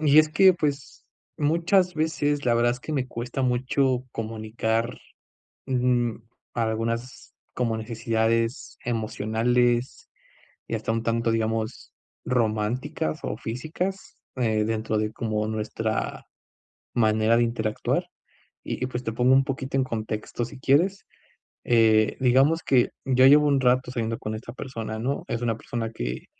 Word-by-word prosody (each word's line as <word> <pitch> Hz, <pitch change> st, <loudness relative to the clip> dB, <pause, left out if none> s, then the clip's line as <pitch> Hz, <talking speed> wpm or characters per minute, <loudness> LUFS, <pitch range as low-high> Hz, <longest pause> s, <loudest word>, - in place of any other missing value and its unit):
Y 150 Hz, -1 st, +5 dB
es 155 Hz, 0 st, +6 dB
que 190 Hz, +1 st, +6 dB
pues, 145 Hz, -4 st, -3 dB, 0.3 s
muchas 170 Hz, +5 st, +2 dB
veces, 145 Hz, -2 st, 0 dB
la 120 Hz, -, +4 dB
verdad, 120 Hz, +1 st, +3 dB
es 125 Hz, -, -7 dB
que 155 Hz, -, -6 dB
me 135 Hz, -4 st, 0 dB
cuesta 120 Hz, +2 st, -4 dB
mucho 130 Hz, +1 st, +1 dB
comunicar, 110 Hz, +1 st, -2 dB, 0.7 s
mm, 125 Hz, -3 st, +1 dB, 0.4 s
algunas, 115 Hz, +2 st, -3 dB, 0.2 s
como 115 Hz, -3 st, -1 dB
necesidades 115 Hz, +1 st, -1 dB
emocionales, 120 Hz, +2 st, 0 dB, 0.6 s
y -, -, -4 dB
hasta -, -, -1 dB
un 115 Hz, 0 st, -1 dB
tanto, 115 Hz, 0 st, 0 dB
digamos, 110 Hz, +1 st, -2 dB, 0.3 s
románticas 110 Hz, -7 st, -1 dB
o -, -, -3 dB
físicas, 185 Hz, -, -4 dB, 0.2 s
eh, 110 Hz, -4 st, +1 dB
dentro 110 Hz, 0 st, -1 dB
de 105 Hz, 0 st, -1 dB
como 110 Hz, -2 st, -2 dB
nuestra 110 Hz, 0 st, -3 dB, 0.7 s
manera 110 Hz, 0 st, +3 dB
de 120 Hz, -, +4 dB
interactuar, 110 Hz, -2 st, -1 dB, 0.6 s
y -, -, -4 dB
y -, -, 0 dB
pues 125 Hz, 0 st, -5 dB
te 115 Hz, -, -2 dB
pongo 125 Hz, +3 st, +3 dB
un 135 Hz, -, +5 dB
poquito 135 Hz, 0 st, -3 dB
en 130 Hz, -, +3 dB
contexto 110 Hz, 0 st, -3 dB
si 130 Hz, +3 st, -10 dB
quieres, 170 Hz, +10 st, +2 dB, 0.6 s
eh, 110 Hz, -2 st, +4 dB
digamos 135 Hz, +6 st, +3 dB
que 125 Hz, -3 st, +3 dB, 0.2 s
ya 130 Hz, -1 st, +5 dB
llevo 150 Hz, +2 st, +7 dB
un 140 Hz, -2 st, +3 dB
rato 125 Hz, 0 st, +2 dB
saliendo 115 Hz, -2 st, -2 dB
con 110 Hz, 0 st, -4 dB
esta 120 Hz, +2 st, -8 dB
persona, 115 Hz, -4 st, -5 dB
¿no?, 130 Hz, +5 st, -2 dB
es 120 Hz, 0 st, -3 dB
una 115 Hz, -2 st, 0 dB
persona 115 Hz, 0 st, -4 dB
que -, -, -5 dB
120 Hz, 140 wpm, -25 LUFS, 110-130 Hz, 0.7 s, llevo